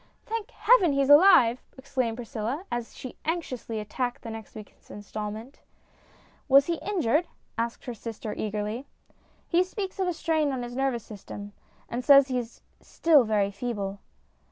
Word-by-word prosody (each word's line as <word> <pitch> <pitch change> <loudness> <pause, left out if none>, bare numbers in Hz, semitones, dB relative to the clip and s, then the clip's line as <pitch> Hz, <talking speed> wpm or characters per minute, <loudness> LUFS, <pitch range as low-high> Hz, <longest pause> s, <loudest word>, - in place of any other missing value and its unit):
" - - -40
Thank 450 -1 -4
heaven, 395 -10 +4
he's 275 0 +2
alive! 290 -7 +7
" - - -33
exclaimed 260 -4 -2
Priscilla, 245 - -4
as 240 -1 -4
she 255 - -9
anxiously 265 -9 -3
attacked 245 +4 -3
the 230 - -6
next 220 -1 -9
week's 215 -1 -13
instalment. 215 +4 -7 0.4
" - - -31
Was 275 +1 +7
he 335 0 -2
injured? 345 - +1
" - - -41
asked 230 0 -3
her 245 - -4
sister 225 -1 -6
eagerly. 215 +5 -3 0.3
" - - -36 0.2
He 345 +2 +3
speaks 385 +1 -6
of 375 - +1
a 355 - 0
strain 315 -3 0
on 255 -2 -3
his 240 0 -7
nervous 265 -4 0
system, 205 -1 -9 0.3
and 245 +2 -4
says 275 -1 +7
he 255 -1 0
is 235 -1 -9 0.2
still 305 -6 +3
very 205 -2 +1
feeble." 200 -2 -4
245 Hz, 175 wpm, -27 LUFS, 220-300 Hz, 0.4 s, alive